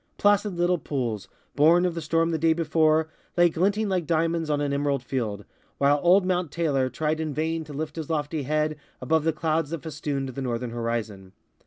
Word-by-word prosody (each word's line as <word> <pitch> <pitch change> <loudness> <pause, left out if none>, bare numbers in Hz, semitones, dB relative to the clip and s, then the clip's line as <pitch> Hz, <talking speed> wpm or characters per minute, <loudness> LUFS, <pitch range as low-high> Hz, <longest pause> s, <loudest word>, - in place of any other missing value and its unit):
Placid 205 -1 +2
little 175 0 +1
pools, 120 -9 -3 0.3
born 165 +5 +5
of 180 - 0
the 165 - -4
storm 165 +2 +1
the 160 - -1
day 160 +1 +4
before, 160 -1 +2 0.3
lay 175 0 +6
glinting 200 +6 +1
like 180 -5 -1
diamonds 165 -1 0
on 145 -1 +1
an 145 -1 -1
emerald 140 -2 0
field, 110 -6 -3 0.3
while 145 +1 +3
old 185 +2 +5
Mount 180 -4 0
Taylor 140 -6 0
tried 155 +4 -1
in 155 -3 -3
vain 160 +1 -1
to 150 - -10
lift 150 +2 -5
his 160 -1 -5
lofty 150 -1 -1
head 155 +2 0 0.2
above 155 +4 +1
the 165 - +3
clouds 155 -1 -1
that 165 -2 -5
festooned 145 -4 -3
the 130 +2 -6
northern 120 -1 -3
horizon. 115 -5 -4
155 Hz, 195 wpm, -25 LUFS, 140-165 Hz, 0.3 s, lay